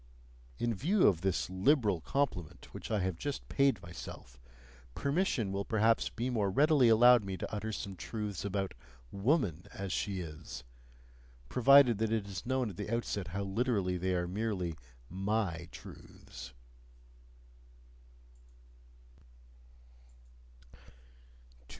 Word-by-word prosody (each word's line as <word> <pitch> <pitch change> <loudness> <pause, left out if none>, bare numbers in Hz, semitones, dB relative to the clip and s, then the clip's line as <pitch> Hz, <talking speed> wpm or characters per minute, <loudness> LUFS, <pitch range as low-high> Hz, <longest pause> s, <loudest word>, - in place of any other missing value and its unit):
In 120 -1 0
view 180 - +2
of 85 -5 +4
this 95 -2 0
liberal 100 - +2
compliment 100 - -2
which - - -7
I 105 -3 +1
have 90 -3 -2
just 145 -1 -4
paid 140 -7 +3
myself, 85 -8 -10 0.6
permission 140 - 0
will 100 +1 -1
perhaps 110 +2 +2
be 120 +3 -3
more 105 -5 +1
readily 140 +3 +4
allowed 120 +1 +7
me 95 -1 -4
to - - -6
utter 110 +1 -3
some 100 -2 -5
truths 105 0 -5
about 100 -1 -2 0.4
"woman 100 - 0
as 95 -1 -4
she 100 -2 -2
is," 80 -4 -8 0.9
provided 125 -3 +6
that 110 0 0
it 110 -3 0
is 100 +3 -7
known 130 -4 0
at 90 - -13
the - - -4
outset 110 -5 -2
how 100 +5 -3
literally 100 -2 0
they 90 +1 0
are 90 0 -1
merely 95 -4 -2 0.3
MY 95 - -2
truths. 60 +1 -11
100 Hz, 120 wpm, -32 LUFS, 95-120 Hz, 0.9 s, allowed